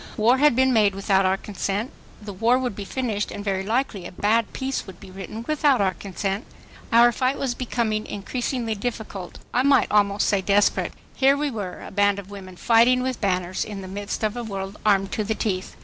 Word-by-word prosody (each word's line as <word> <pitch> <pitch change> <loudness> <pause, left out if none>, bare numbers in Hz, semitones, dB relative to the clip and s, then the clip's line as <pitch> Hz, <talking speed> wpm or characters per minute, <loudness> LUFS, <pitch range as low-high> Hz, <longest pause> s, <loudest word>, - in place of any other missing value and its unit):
War 235 +4 +4
had 295 -3 +5
been 260 0 +3
made 210 -4 +3
without 195 -1 +2
our 190 +1 +2
consent. 205 +3 -3 0.3
The 210 -1 -8
war 230 +6 +3
would 250 -5 -2
be 200 - -6
finished 215 -3 -2
and 205 - -7
very 195 -2 0
likely 215 -4 -1
a - - -11
bad 210 +4 +1
peace 265 0 -3
would 185 -2 -11
be 195 - -12
written 195 +4 -7
without 295 -3 +3
our 190 -2 +2
consent. 195 +3 -3 0.5
Our 235 +1 +6
fight 260 +3 0
was 265 -3 -1
becoming 230 -3 -2
increasingly 235 +3 -3
difficult—I 215 0 -4
might 275 0 +3
almost 205 -1 +3
say 200 -2 +2
desperate. 200 +1 +2 0.2
Here 275 +1 +4
we 290 -1 -1
were, 200 -6 -6
a - - -9
band 205 0 +2
of 200 0 -9
women 190 -2 -9
fighting 235 +5 +4
with 260 -2 -3
banners, 185 -2 0
in 205 -2 -7
the - - -7
midst 200 +3 -5
of 215 +1 0
a 240 - -4
world 195 -2 -5
armed 195 -2 +3
to 215 - -1
the 220 +1 -1
teeth. 190 -4 -3
210 Hz, 205 wpm, -24 LUFS, 195-245 Hz, 0.5 s, Our